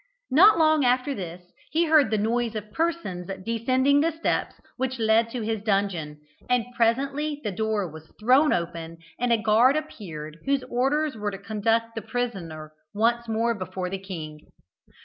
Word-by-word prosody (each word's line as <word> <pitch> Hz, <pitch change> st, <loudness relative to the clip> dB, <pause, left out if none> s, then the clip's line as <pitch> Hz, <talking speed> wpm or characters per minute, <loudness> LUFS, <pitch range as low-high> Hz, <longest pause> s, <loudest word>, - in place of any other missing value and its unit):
Not 370 Hz, +8 st, +7 dB
long 310 Hz, -2 st, +4 dB
after 255 Hz, +3 st, +2 dB
this, 180 Hz, -4 st, -7 dB, 0.3 s
he 330 Hz, +2 st, +2 dB
heard 310 Hz, -3 st, +5 dB
the 215 Hz, -, +1 dB
noise 230 Hz, +2 st, 0 dB
of 210 Hz, 0 st, -6 dB
persons 320 Hz, -, -2 dB, 0.2 s
descending 255 Hz, +5 st, +2 dB
the 325 Hz, -, +3 dB
steps 320 Hz, +1 st, -1 dB, 0.2 s
which 260 Hz, 0 st, -2 dB
led 225 Hz, 0 st, +3 dB
to 235 Hz, -1 st, -4 dB
his 220 Hz, -1 st, -2 dB
dungeon, 195 Hz, -8 st, -1 dB, 0.3 s
and 250 Hz, -2 st, +2 dB
presently 275 Hz, +6 st, 0 dB
the 210 Hz, -, -2 dB
door 215 Hz, 0 st, -1 dB
was 160 Hz, 0 st, -12 dB
thrown 260 Hz, +7 st, +4 dB
open, 165 Hz, -1 st, -3 dB, 0.2 s
and 245 Hz, 0 st, +1 dB
a 235 Hz, -, +5 dB
guard 220 Hz, +5 st, +4 dB
appeared, 165 Hz, -, -7 dB
whose 275 Hz, -1 st, +1 dB
orders 275 Hz, +4 st, 0 dB
were 210 Hz, -1 st, -2 dB
to 195 Hz, -, -6 dB
conduct 225 Hz, +3 st, 0 dB
the 225 Hz, -, -4 dB
prisoner 175 Hz, -11 st, -4 dB, 0.2 s
once 235 Hz, +2 st, +1 dB
more 225 Hz, +1 st, +1 dB
before 185 Hz, -2 st, -5 dB
the 195 Hz, -, -3 dB
king. 160 Hz, -6 st, -7 dB
225 Hz, 165 wpm, -25 LUFS, 195-260 Hz, 0.3 s, Not